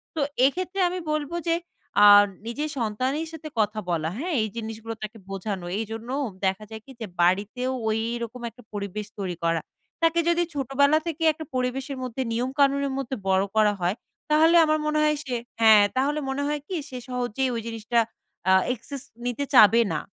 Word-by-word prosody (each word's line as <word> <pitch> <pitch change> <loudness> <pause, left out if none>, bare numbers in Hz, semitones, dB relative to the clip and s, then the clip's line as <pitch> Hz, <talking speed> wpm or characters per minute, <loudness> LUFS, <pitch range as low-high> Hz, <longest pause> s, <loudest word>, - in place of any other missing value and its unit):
তো - - -2 0.3
এক্ষেত্রে 365 +7 -1
আমি 365 +1 -3
বলব 305 0 -2 0.2
যে, 330 - +3 0.5
আ - - +10 0.4
নিজের 290 +7 -3
সন্তানের 255 +7 -1
সাথে 315 -1 -8
কথা 215 0 +1
বলা। 160 -2 0
হ্যাঁ? 345 +5 -3
এই 215 - 0
জিনিসগুলো 225 0 -5
তাকে 215 +1 -6
বোঝানো। 195 -1 -4
এই 225 - -2
জন্যও 240 +5 -3 0.2
দেখা 190 +2 0
যায় 220 -1 -8
কি 270 - -13
যে, 225 - -2 0.2
বাড়িতেও 205 +8 +1 0.2
ওইরকম 230 +2 -2
একটা 245 +2 -18
পরিবেশ 205 0 -4
তৈরি 180 -4 -3
করা। 165 -1 +1 0.4
তাকে 330 +1 +4
যদি 345 0 +3
ছোটবেলা 280 +2 +3
থেকে 325 0 -3
একটা 315 +1 -8
পরিবেশের 260 +2 -2
মধ্যে 255 +1 -4
নিয়ম-কানুনের 275 +3 +1
মধ্যে 265 -1 -3
বড়ো 190 +1 +3
করা 215 -1 +4
হয়, 175 +3 +1 0.4
তাহলে 320 +3 +5
আমার 310 0 +2
মনে 305 0 +1
হয় 300 -1 +2
সে 255 -2 -2 0.3
হ্যাঁ, 220 -2 +8
তাহলে 285 +3 +1
মনে 275 +2 -1
হয় 295 0 -1
কি 375 - -4
সে 255 - -6
সহজেই 250 +1 -1
ওই 230 - -2
জিনিসটা, 225 +1 0 0.5
a - - +7 0.2
access 260 +3 -8 0.2
নিতে 245 +3 -1
চাবে 230 -1 +8
না 150 - 0
250 Hz, 175 wpm, -25 LUFS, 215-285 Hz, 0.5 s, আ